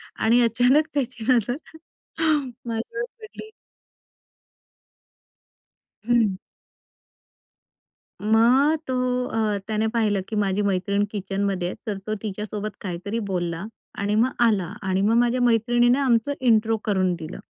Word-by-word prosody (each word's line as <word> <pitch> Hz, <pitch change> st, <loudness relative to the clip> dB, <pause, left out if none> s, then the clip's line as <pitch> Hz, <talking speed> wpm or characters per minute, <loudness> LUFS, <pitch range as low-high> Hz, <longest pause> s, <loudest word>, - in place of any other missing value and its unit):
आणि 235 Hz, +2 st, +3 dB
अचानक 245 Hz, +7 st, +3 dB
त्याची 250 Hz, -5 st, -3 dB
नजर 245 Hz, +1 st, +1 dB, 1.1 s
माझ्यावर 235 Hz, -, -3 dB, 0.2 s
पडली. 435 Hz, 0 st, -10 dB, 2.6 s
हं. 225 Hz, -6 st, +2 dB, 1.8 s
मग 240 Hz, +8 st, +4 dB
तो 260 Hz, -, -2 dB, 0.3 s
अ, 220 Hz, -3 st, 0 dB
त्याने 220 Hz, 0 st, 0 dB
पाहिलं, 220 Hz, -3 st, +1 dB
की 220 Hz, -, -4 dB
माझी 205 Hz, 0 st, +1 dB
मैत्रीण 200 Hz, +1 st, 0 dB
किचनमध्ये 195 Hz, -2 st, -2 dB
आहे, -, -, -5 dB
तर 205 Hz, -2 st, -3 dB
तो 215 Hz, -, -1 dB
तिच्यासोबत 210 Hz, 0 st, -4 dB
काहीतरी 200 Hz, +4 st, -4 dB
बोलला 175 Hz, -2 st, -2 dB, 0.3 s
आणि 205 Hz, +1 st, 0 dB
मग 235 Hz, +4 st, +3 dB, 0.2 s
आला 195 Hz, -7 st, 0 dB
आणि 190 Hz, -1 st, 0 dB
मग 215 Hz, +3 st, +3 dB
माझ्या 240 Hz, +1 st, +2 dB
मैत्रिणीनं 240 Hz, +2 st, +3 dB
आमचं 235 Hz, +2 st, +2 dB
इंट्रो 225 Hz, -3 st, +3 dB
करून 190 Hz, -3 st, +1 dB
दिलं, 165 Hz, +1 st, -8 dB
220 Hz, 115 wpm, -24 LUFS, 200-240 Hz, 2.6 s, मग